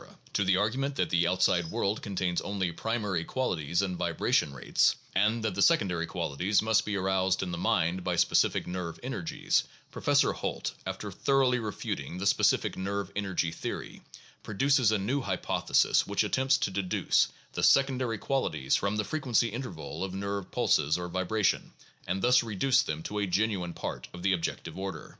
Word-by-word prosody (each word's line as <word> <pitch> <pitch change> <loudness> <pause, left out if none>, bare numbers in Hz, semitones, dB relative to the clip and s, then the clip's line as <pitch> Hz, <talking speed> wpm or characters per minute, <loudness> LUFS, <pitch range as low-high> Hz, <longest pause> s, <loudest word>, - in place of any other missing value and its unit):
To 105 - +2
the 95 -1 +3
argument 130 +8 0
that - - -1
the 85 -1 +3
outside 90 -1 +2
world 100 +5 -1
contains 95 -3 -1
only 95 -3 -2
primary 105 -2 -2
qualities 85 - -1
and 95 -2 -2
vibration 85 -3 +1
rates, 70 - +2 0.2
and 110 +4 +2
that 110 -3 0
the 100 - -2
secondary 90 - +3
qualities 90 +8 0
must 110 0 +2
be 105 - -2
aroused 95 -1 +1
in 90 - -4
the 85 - -3
mind 90 +1 +1
by 90 - -1
specific - - +2
nerve 90 -2 -5
energies, - - -1 0.3
Professor - - +2
Holt, - - -3
after 95 +2 -5
thoroughly 130 +4 +2
refuting 105 -5 -4
the 95 - -4
specific 100 - +2
nerve 100 0 -3
energy 95 -5 -1
theory, 85 - -6 0.4
produces 130 +2 +2
a 110 - +2
new 120 +9 -1
hypothesis 95 -6 +1
which - - +1
attempts 130 +1 +2
to 125 -6 -1
deduce 95 -1 +1 0.3
the - - -3
secondary 130 -4 +3
qualities 130 - 0
from 100 +1 0
the 105 - 0
frequency 120 -5 0
inter 125 +2 -4
val 80 0 -6
of 95 -1 -4
nerve 100 0 -3
pulses 75 +4 +2
or 90 0 -5
vibration, 95 +3 0 0.3
and 95 +2 -2
thus 125 +1 +5
reduce 120 +4 +2
them 75 +1 -4
to 105 +4 -3
a 100 - 0
genuine 95 -2 0
part - - -5
of 90 - -9
the 95 0 +3
objective 90 +1 -3
order. 95 0 -5
100 Hz, 170 wpm, -29 LUFS, 90-110 Hz, 0.4 s, thus